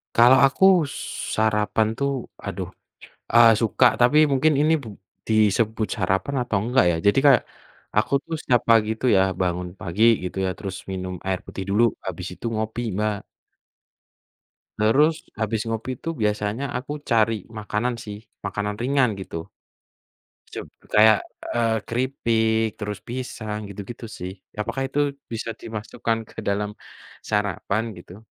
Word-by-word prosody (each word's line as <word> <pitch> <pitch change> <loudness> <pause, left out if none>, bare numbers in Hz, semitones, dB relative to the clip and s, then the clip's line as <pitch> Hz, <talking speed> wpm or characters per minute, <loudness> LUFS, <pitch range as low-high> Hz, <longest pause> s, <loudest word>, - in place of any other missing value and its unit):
Kalau 120 +3 +7
aku 135 +7 0 0.7
sarapan 110 0 +2
tuh, 140 0 0 0.3
aduh, - - -4 0.6
eee, 115 -1 +8
suka, 115 +3 +2 0.2
tapi 130 +5 +5
mungkin 145 +4 +3
ini 155 +2 +4
bu 115 - -9 0.4
disebut 110 0 +2
sarapan 95 +8 0
atau 115 - -2
enggak, 125 0 +3
ya. 85 - 0
Jadi 100 +6 +5
kayak, 135 -5 +6 0.5
aku 105 - +2
tuh 165 - -5
setiap 120 -3 +2
pagi 110 -2 +5
tuh 130 - +2
ya - - +5 0.2
bangun 90 0 -1
pagi 95 +1 -2 0.2
gitu 90 0 -5
ya, - - 0
terus 95 -2 -5
minum 95 -1 -4
air 95 -1 0
putih 95 - -6
dulu, 105 +4 +3 0.2
habis 90 -1 -5
itu 115 - -7
ngopi, 110 +2 -2
Mbak. 105 -1 -1 1.6
Terus 150 +9 +3 0.2
habis 110 0 0
ngopi 115 +2 -3
tuh 165 - -2
biasanya 105 +3 0
aku 130 +4 -6 0.2
cari 115 -1 +3 0.3
makanan 110 +3 -2
sih, 105 -2 -7 0.3
makanan 105 +1 -2
ringan, 135 0 +2
gitu. 95 - -8 1.2
Seb - - -5 0.3
kayak, 110 0 +7 0.3
eee, 115 -1 +1
keripik, 115 -3 +1
terus 105 -1 -4
pisang, 115 -4 -5
gitu-gitu, 100 +4 -8
sih. 90 +1 -5 0.3
Apakah 115 +5 -2
itu 140 - -3 0.3
bisa 115 0 -3
dimasukkan 115 +1 -3
ke - - -21
dalam 105 +1 0 0.6
sarapan, 105 0 0 0.2
gitu? 95 +5 -13
110 Hz, 135 wpm, -23 LUFS, 105-120 Hz, 1.6 s, eee